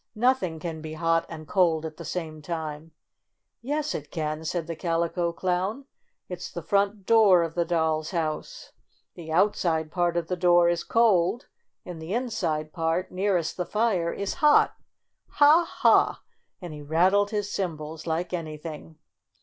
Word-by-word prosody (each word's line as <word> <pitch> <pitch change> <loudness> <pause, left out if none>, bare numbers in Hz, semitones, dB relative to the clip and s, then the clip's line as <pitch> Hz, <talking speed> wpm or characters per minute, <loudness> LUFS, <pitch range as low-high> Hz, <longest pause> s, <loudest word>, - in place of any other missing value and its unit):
"Nothing 235 -8 +1
can 160 -1 -5
be 155 0 -7
hot 165 +1 +1
and 155 -2 -9
cold 165 -3 +2
at 155 -1 -7
the - - -8
same 160 -3 -5
time." 160 -1 -5 0.7
"Yes, 290 +4 -2
it 150 - -6
can!" 155 -1 -3
said 165 +1 -2
the 165 0 -5
Calico 170 +1 -1
Clown. 185 +9 -2 0.4
"It's - - -7
the - - -6
front 200 -1 0
door 205 -6 +6
of 165 -1 -4
the 170 0 0
doll's 160 -2 0
house. 160 -4 -4 0.4
The 160 -2 -9
outside 165 -3 +1
part 175 -1 0
of 170 - 0
the 180 - -1
door 175 -1 +4
is 175 0 -1
cold, 225 -1 +2 0.4
and 175 -3 -8
the 170 +6 -3
inside 170 -11 -2
part, 165 +1 -1
nearest 185 -3 0
the 180 - -2
fire, 210 -6 +1
is 200 0 -3
hot. 300 -1 +5 0.6
Ha, 300 +4 +6
Ha - - +3 0.2
!" - - -50
and 175 -3 -6
he 150 - -8
rattled 185 +7 +2
his 205 -2 -3
cymbals 160 -3 -4
like 170 +3 -2
any 160 -3 -4
thing. 155 0 -9
170 Hz, 165 wpm, -26 LUFS, 160-195 Hz, 0.7 s, door